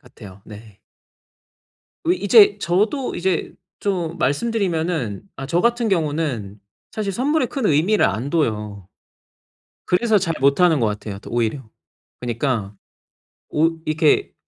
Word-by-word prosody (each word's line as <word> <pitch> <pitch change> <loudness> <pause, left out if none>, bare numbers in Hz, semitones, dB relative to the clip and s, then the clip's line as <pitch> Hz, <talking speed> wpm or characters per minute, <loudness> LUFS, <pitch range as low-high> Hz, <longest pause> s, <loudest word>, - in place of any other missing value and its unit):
같아요. 100 -1 -14
네. 105 -1 -13 1.3
어 330 - +1
이제 410 +3 +5
저도 210 +10 0
이제 180 -2 -1 0.3
좀 175 -4 -2
말씀 145 - 0
드리면은 165 - -1
아 135 - -6
저 170 +5 +1
같은 235 +1 +1
경우는 145 - -1 0.3
사실 205 -2 -3
선물에 265 - +1
큰 265 -5 -2
의미를 165 +9 +3
안 115 +8 -3
둬요. 105 - -2 1.0
그래서 215 +4 +3
잘 170 -3 -1
못하는 145 +2 +4
것 115 - +2
같아요. 105 -1 -4
더 - - -12
오히려. 120 +3 -1 0.6
그니까 120 -4 -2 0.8
오 165 +2 +1
이렇게 155 0 +2
160 Hz, 245 characters per minute, -21 LUFS, -, 1.3 s, 이제